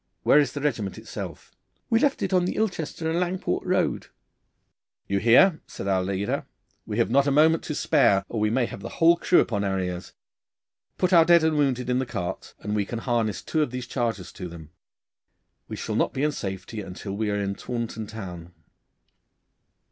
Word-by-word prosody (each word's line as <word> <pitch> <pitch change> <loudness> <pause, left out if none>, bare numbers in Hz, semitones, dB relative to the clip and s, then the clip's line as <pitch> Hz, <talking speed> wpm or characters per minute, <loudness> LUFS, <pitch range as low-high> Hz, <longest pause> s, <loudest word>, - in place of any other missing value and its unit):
'Where 150 - +6
is 140 -4 +1
the 145 - -4
regiment 115 -10 -2
itself?' - - -8 0.4
'We 225 - +5
left 280 +1 +1
it - - -1
on 180 -1 +3
the - - -2
Ilchester 165 -6 -2
and 165 +2 0
Langport 180 +1 -1
road.' 185 -2 0 1.0
'You 100 0 0
hear,' 140 - +5
said 125 -6 -7
our 95 -1 +2
leader. 100 +1 -2 0.4
'We 105 - -3
have 115 -1 +1
not 140 +2 +4
a - - +3
moment 160 +3 +4
to 150 - -3
spare, 105 -12 +3
or 115 - -4
we 105 0 +2
may 120 +2 +1
have 100 - -8
the - - -6
whole 170 +1 +6
crew 175 - +4
about 100 -3 -1
our 95 -1 0
ears. 90 -1 -4 0.8
Put 185 0 +1
our 170 -2 +8
dead 170 0 +5
and 160 -1 +2
wounded 130 -4 +1
in 125 0 +1
the 130 - -2
carts, 90 -6 -5
and 105 0 -2
we 105 - +1
can 115 +4 -5
harness 115 -3 -1
two 160 - 0
of 150 - +1
these 125 0 -5
chargers 115 -8 -3
to 90 - -7
them. 80 -2 -11 1.0
We - - -5
shall - - -4
not - - +1
be 135 - -2
in 150 - +2
safety 95 -2 -5
until 95 +1 -7
we 110 0 -1
are 105 - 0
in 100 -1 -1
Taunton 115 -1 -5
town. 90 -6 -8
120 Hz, 200 wpm, -25 LUFS, 100-155 Hz, 1.0 s, our